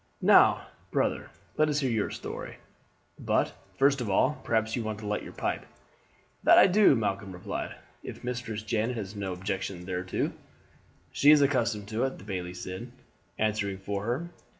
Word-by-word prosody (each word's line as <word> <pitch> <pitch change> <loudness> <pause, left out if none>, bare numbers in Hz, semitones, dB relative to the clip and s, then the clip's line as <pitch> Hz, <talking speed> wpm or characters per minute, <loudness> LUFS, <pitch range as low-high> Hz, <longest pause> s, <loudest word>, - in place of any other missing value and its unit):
"Now, - - +6 0.2
brother, - - 0 0.3
let 155 0 +3
us 150 0 +1
hear 130 -3 0
your 110 -3 0
story; - - -7 0.6
but, - - +1 0.2
first 140 0 +3
of 115 - -3
all, 130 +9 +2
perhaps 110 -1 0
you 120 - -2
want 110 -1 -3
to 110 - -9
light 105 0 -1
your - - -9
pipe?" - - -2 0.8
"That 190 - +7
do 210 -6 +7
I," - - +3
Malcolm 100 -4 -2
replied, 90 0 -5 0.3
"if - - -9
Mistress 120 -3 -4
Janet 110 +3 -1
has 105 -1 -5
no 100 -2 -3
objection 95 -1 -4
thereto." 90 0 -2 0.8
"She 145 - +4
is 150 -1 +8
accustomed 115 -7 +1
to 115 +2 -1
it," 135 - -3
the - - -13
bailie 90 -3 -5
said, 95 +7 -7 0.5
answering 105 -2 0
for 100 +1 -4
her. 130 +9 -2
110 Hz, 170 wpm, -28 LUFS, 95-125 Hz, 0.8 s, is